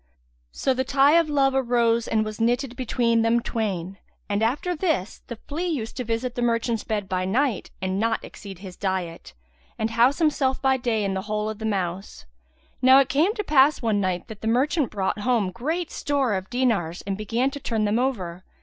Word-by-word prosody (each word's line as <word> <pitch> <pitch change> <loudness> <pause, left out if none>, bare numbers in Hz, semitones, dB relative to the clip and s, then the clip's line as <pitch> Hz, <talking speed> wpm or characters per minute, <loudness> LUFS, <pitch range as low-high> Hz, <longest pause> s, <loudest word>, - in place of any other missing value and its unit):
So 265 - 0
the 260 +1 -1
tie 270 +2 +4
of 330 -2 0
love 275 -2 +2
arose 235 -3 +2
and 220 -1 +1
was 215 +1 -6
knitted 245 +2 0
between 235 -2 +1
them 230 +1 +3
twain, 195 -5 -3 0.3
and 205 0 -1
after 290 +10 0
this, 305 - -1
the 235 - -5
flea 310 +10 -5
used 250 -10 -3
to 250 - -2
visit 235 +2 -2
the 245 - -4
merchant's 230 -1 0
bed 210 -3 -2
by 185 -1 -1
night 235 +4 0
and 190 +1 -1
not 225 +1 0
exceed 195 -3 -10
in 185 - -16
his 185 -2 -8
diet, 180 - -4 0.4
and 220 +1 -1
house 240 +6 +3
him 315 -2 +4 0.3
by 265 0 +3
day 235 -4 0
in 195 - -1
the 190 - -2
hole 215 0 -1
of 215 - -9
the 220 - -4
mouse. 190 - -3 0.6
Now 260 +1 +7
it 275 -1 +4
came 330 +10 +2
to 420 - -2
pass 290 -4 +4
one 215 -3 +1
night, 185 -2 -2
the 220 -1 -7
merchant 275 +4 +2
brought 200 0 -2
home 215 -4 +1
great 315 - -3
store 280 -6 0
of 190 0 -3
dinars 220 -10 0
and 195 -1 -3
began 230 +6 -1
to 285 - -6
turn 225 -5 -1
them 210 +3 +1
over. 185 -9 -2
230 Hz, 205 wpm, -24 LUFS, 205-265 Hz, 0.6 s, Now